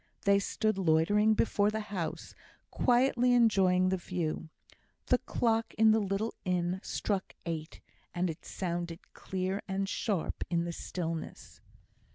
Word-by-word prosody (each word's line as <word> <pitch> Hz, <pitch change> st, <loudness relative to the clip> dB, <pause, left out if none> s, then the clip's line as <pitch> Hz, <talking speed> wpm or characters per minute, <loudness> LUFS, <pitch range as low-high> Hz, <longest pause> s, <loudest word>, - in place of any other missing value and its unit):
They 200 Hz, 0 st, +5 dB
stood 215 Hz, +1 st, -1 dB
loitering 195 Hz, +6 st, +3 dB
before 205 Hz, -1 st, +2 dB
the 220 Hz, +1 st, -2 dB
house, 180 Hz, -5 st, -4 dB, 0.4 s
quietly 245 Hz, 0 st, +3 dB
enjoying 190 Hz, -6 st, +4 dB
the 190 Hz, -, +1 dB
view. 170 Hz, -3 st, -3 dB, 0.6 s
The 250 Hz, -, +3 dB
clock 225 Hz, -1 st, 0 dB
in 220 Hz, 0 st, +6 dB
the 220 Hz, -, +4 dB
little 205 Hz, +2 st, -1 dB
inn 180 Hz, 0 st, 0 dB
struck 200 Hz, -2 st, -3 dB
eight, 160 Hz, -1 st, -5 dB, 0.3 s
and 180 Hz, +1 st, 0 dB
it 160 Hz, -2 st, -6 dB
sounded 175 Hz, -1 st, -5 dB
clear 190 Hz, +1 st, -3 dB
and 195 Hz, 0 st, -1 dB
sharp 195 Hz, -3 st, -2 dB
in 170 Hz, -1 st, +1 dB
the 170 Hz, 0 st, -4 dB
stillness. 165 Hz, -2 st, -5 dB
190 Hz, 135 wpm, -31 LUFS, 175-215 Hz, 0.6 s, in